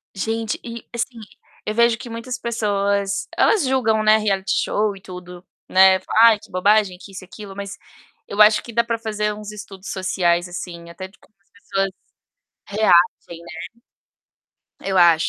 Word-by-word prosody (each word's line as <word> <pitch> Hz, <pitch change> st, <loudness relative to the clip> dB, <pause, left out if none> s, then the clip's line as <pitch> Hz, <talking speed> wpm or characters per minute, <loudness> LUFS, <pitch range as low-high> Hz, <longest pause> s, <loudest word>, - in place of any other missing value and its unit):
Gente, 225 Hz, +3 st, -2 dB
e, 235 Hz, -1 st, -8 dB
assim, 235 Hz, 0 st, -3 dB, 0.5 s
eu 215 Hz, -, -2 dB
vejo 235 Hz, -1 st, +4 dB
que 240 Hz, 0 st, -9 dB
muitas 230 Hz, +3 st, -5 dB
pessoas, 200 Hz, -3 st, -1 dB
elas 400 Hz, -10 st, +3 dB
julgam, 225 Hz, -5 st, +1 dB
né, 215 Hz, 0 st, +6 dB
reality 195 Hz, -3 st, -1 dB
show 210 Hz, -1 st, 0 dB
e 190 Hz, -, -14 dB
tudo, 180 Hz, -1 st, -10 dB, 0.2 s
né. 190 Hz, 0 st, +6 dB
Falam: 220 Hz, -, +1 dB
"Ai, 225 Hz, -2 st, +7 dB
que -, -, -17 dB
bobagem, 195 Hz, 0 st, +2 dB
que 195 Hz, -, -13 dB
isso 195 Hz, 0 st, -9 dB
e -, -, -11 dB
aquilo", 195 Hz, 0 st, -10 dB
mas 200 Hz, 0 st, -6 dB, 0.5 s
eu 205 Hz, -, 0 dB
acho 210 Hz, 0 st, +6 dB
que 235 Hz, -, -10 dB
dá 235 Hz, +1 st, +3 dB
pra 230 Hz, -1 st, -2 dB
fazer 210 Hz, -1 st, -2 dB
uns 210 Hz, 0 st, -8 dB
estudos 200 Hz, -2 st, -10 dB
sociais, 175 Hz, -2 st, 0 dB
assim, 170 Hz, -1 st, -8 dB
até 185 Hz, +3 st, -8 dB
de 190 Hz, -, -24 dB
como 215 Hz, -, -26 dB
as -, -, -40 dB
pessoas 195 Hz, -1 st, -2 dB, 0.8 s
reagem, 180 Hz, -4 st, +2 dB, 1.2 s
né? -, -, -11 dB
Eu 190 Hz, -, 0 dB
acho. 170 Hz, -2 st, +5 dB
205 Hz, 175 wpm, -21 LUFS, 190-220 Hz, 1.2 s, Ai